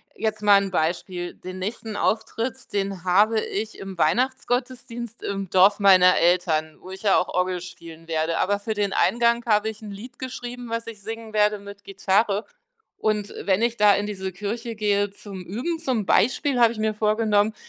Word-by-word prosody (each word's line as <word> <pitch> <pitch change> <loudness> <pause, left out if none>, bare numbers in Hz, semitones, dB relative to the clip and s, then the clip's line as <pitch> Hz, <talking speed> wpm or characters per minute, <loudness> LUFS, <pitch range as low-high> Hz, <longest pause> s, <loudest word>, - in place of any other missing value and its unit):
jetzt 215 -1 -2
mal 205 -1 +6
'n 195 -1 -3
Beispiel: 175 +2 -2
Den 185 +1 -8
nächsten 215 +2 -5
Auftritt, 225 +4 -2
den 195 -2 -2
habe 205 +5 +3
ich 215 +1 -4
im 195 -1 -8
Weihnachtsgottesdienst 245 - -1
im 195 -2 -4
Dorf 195 +2 +5
meiner 185 -2 +6
Eltern, 165 -3 +1
wo 185 - -12
ich 190 +2 -9
ja 200 - +4
auch 180 - -1
Orgel 180 -1 -1
spielen 165 -2 -11
werde. 165 0 -1
Aber 200 +2 +1
für 220 +2 -3
den 205 -2 -1
Eingang 235 +2 +2
habe 215 -1 +2
ich 220 0 -10
'n 210 - -7
Lied 240 +5 -10
geschrieben, 245 -1 -7
was 230 0 -3
ich 220 -3 -8
singen 225 0 -7
werde 210 -1 +2
mit 200 0 -11
Gitarre. 200 +2 +1 0.6
Und 210 -1 -1
wenn 195 +2 +2
ich 235 0 +1
da 205 -2 +6
in 205 +1 -1
diese 190 -2 -4
Kirche 225 +5 -4
gehe 205 -1 +1
zum 195 -3 -9
Üben, 250 - -3
zum 260 -9 -1
Beispiel, 255 +8 +2
habe 235 -1 +6
ich 215 - -7
mir 215 0 0
vorgenommen, 215 0 +2
205 Hz, 185 wpm, -24 LUFS, 190-225 Hz, 0.6 s, mal